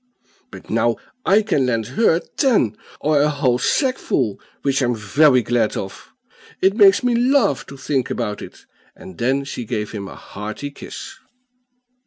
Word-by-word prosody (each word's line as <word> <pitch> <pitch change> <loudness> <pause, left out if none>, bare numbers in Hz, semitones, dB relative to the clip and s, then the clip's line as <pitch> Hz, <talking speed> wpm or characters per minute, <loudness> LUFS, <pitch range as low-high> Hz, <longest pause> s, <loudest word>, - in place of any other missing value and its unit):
But - - -11
now - - +2 0.3
I 205 +3 +5
can 145 -11 +1
lend 115 -3 0
her 215 -7 +3 0.2
ten, 215 - +2 0.3
or 150 -1 +3
a 150 - +3
whole 135 -4 +1
sackful, 140 - 0 0.2
which 140 0 +1
I'm 120 -1 +1
very 125 +5 +3
glad 115 -1 0
of; 95 - -7 0.5
it 195 +1 +3
makes 200 0 +6
me 245 -1 +2
laugh 240 - +2
to 140 - -10
think 135 0 -1
about 105 -4 -3
it;" - - -11 0.3
and 95 - -12
then 135 +3 +1
she 135 -3 -5
gave 105 -2 -3
him 100 -3 -6
a - - -10
hearty 105 +8 -7
kiss. 140 - -9
135 Hz, 160 wpm, -20 LUFS, 115-190 Hz, 0.5 s, makes